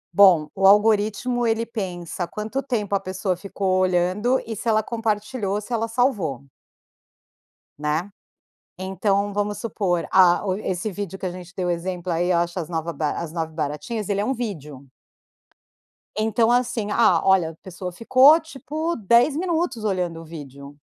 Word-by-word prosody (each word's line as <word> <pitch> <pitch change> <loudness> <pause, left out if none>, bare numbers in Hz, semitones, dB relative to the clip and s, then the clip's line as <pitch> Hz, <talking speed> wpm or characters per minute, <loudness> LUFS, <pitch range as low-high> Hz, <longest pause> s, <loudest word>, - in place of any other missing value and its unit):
Bom, 180 -6 +6
o 195 0 +3
algoritmo, 215 +4 +3
ele 225 +1 +1
pensa 180 -5 -5
quanto 220 +6 -4
tempo 220 -7 -2
a 200 - +3
pessoa 185 0 -2
ficou 190 0 -1
olhando 185 +7 +2
e 225 -1 -5
se 225 +3 -3
ela 215 0 +3
compartilhou, 215 -2 -2
se 225 +4 -7
ela 230 0 0
salvou. 215 - 0 1.4
Né? 150 +6 -1 0.7
Então 200 +2 0
vamos 205 0 -2
supor, 195 -6 -1
ah, 185 -1 +5
o 185 - +1
esse 195 0 -3
vídeo 195 -1 -6
que 190 - -4
a - - -2
gente 180 0 -10
deu 180 -1 -1
o - - +1
exemplo, 180 +1 -3
aí, 175 +2 +1
"ache 175 +1 0
as 170 -2 -4
nova 165 0 -3
ba 155 -2 -1
as 165 -2 -5
9 160 -2 -3
baratinhas", 165 +8 -3
ele 200 -1 0
é - - 0
um 265 - 0
vídeo. 150 - -6 1.3
Então 225 +2 +2
assim: 235 -4 0
"Ah, 190 -8 +4
olha, 190 -4 +4
a - - -16
pessoa 180 +1 -8
ficou, 260 - +6
tipo, 315 +2 -4
10 235 +6 +3
minutos 335 -8 -1
olhando 180 -5 -1
o - - -11
vídeo". 140 -3 -10
195 Hz, 165 wpm, -23 LUFS, 175-225 Hz, 1.4 s, Bom